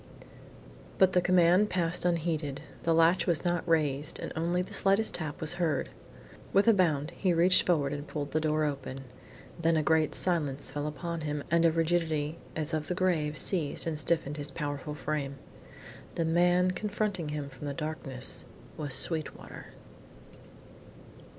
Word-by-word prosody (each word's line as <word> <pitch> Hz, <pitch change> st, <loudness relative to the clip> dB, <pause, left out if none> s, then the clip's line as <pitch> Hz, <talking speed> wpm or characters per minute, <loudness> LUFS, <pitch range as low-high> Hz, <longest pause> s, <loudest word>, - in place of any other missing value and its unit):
But 190 Hz, -1 st, +4 dB
the 180 Hz, -, +4 dB
command 180 Hz, +3 st, +4 dB
passed 175 Hz, -1 st, +1 dB
unheeded; 160 Hz, -5 st, -1 dB, 0.2 s
the 165 Hz, -, +1 dB
latch 165 Hz, +2 st, +4 dB
was 170 Hz, 0 st, 0 dB
not 175 Hz, 0 st, 0 dB
raised, 150 Hz, -2 st, +1 dB
and -, -, -6 dB
only 175 Hz, +2 st, 0 dB
the -, -, -10 dB
slightest 195 Hz, +3 st, +3 dB
tap 155 Hz, -3 st, -4 dB
was 155 Hz, +1 st, 0 dB
heard. 160 Hz, -4 st, 0 dB, 0.6 s
With 200 Hz, +3 st, +3 dB
a 230 Hz, -, +7 dB
bound 160 Hz, -5 st, +1 dB
he 180 Hz, 0 st, 0 dB
reached 180 Hz, +3 st, +5 dB
forward 145 Hz, -6 st, +1 dB
and 145 Hz, +1 st, -6 dB
pulled 145 Hz, -2 st, -5 dB
the 155 Hz, -, +1 dB
door 155 Hz, 0 st, +1 dB
open. 140 Hz, -2 st, -4 dB, 0.6 s
Then 165 Hz, 0 st, +3 dB
a 155 Hz, -, +1 dB
great 160 Hz, 0 st, +2 dB
silence 145 Hz, -7 st, -1 dB
fell 145 Hz, +1 st, -3 dB
upon 160 Hz, +3 st, -4 dB
him 150 Hz, -1 st, -3 dB
and 170 Hz, 0 st, +4 dB
a 165 Hz, -, +5 dB
rigidity 160 Hz, -2 st, 0 dB, 0.2 s
as 155 Hz, 0 st, -2 dB
of 155 Hz, -1 st, -1 dB
the 180 Hz, -, -2 dB
grave 160 Hz, -5 st, 0 dB
seized 155 Hz, -1 st, +1 dB
and 160 Hz, -2 st, -2 dB
stiffened 150 Hz, 0 st, -1 dB
his 145 Hz, 0 st, -1 dB
powerful 145 Hz, 0 st, -5 dB
frame. 145 Hz, -2 st, -3 dB, 0.8 s
The 165 Hz, -, 0 dB
man 175 Hz, +2 st, +3 dB
confronting 200 Hz, -4 st, -2 dB
him 150 Hz, -1 st, -4 dB
from 140 Hz, +1 st, -9 dB
the 140 Hz, -, -3 dB
darkness 145 Hz, -4 st, -4 dB, 0.3 s
was 145 Hz, -3 st, -2 dB
Sweetwater. 155 Hz, +2 st, 0 dB
160 Hz, 160 wpm, -29 LUFS, 150-175 Hz, 0.8 s, a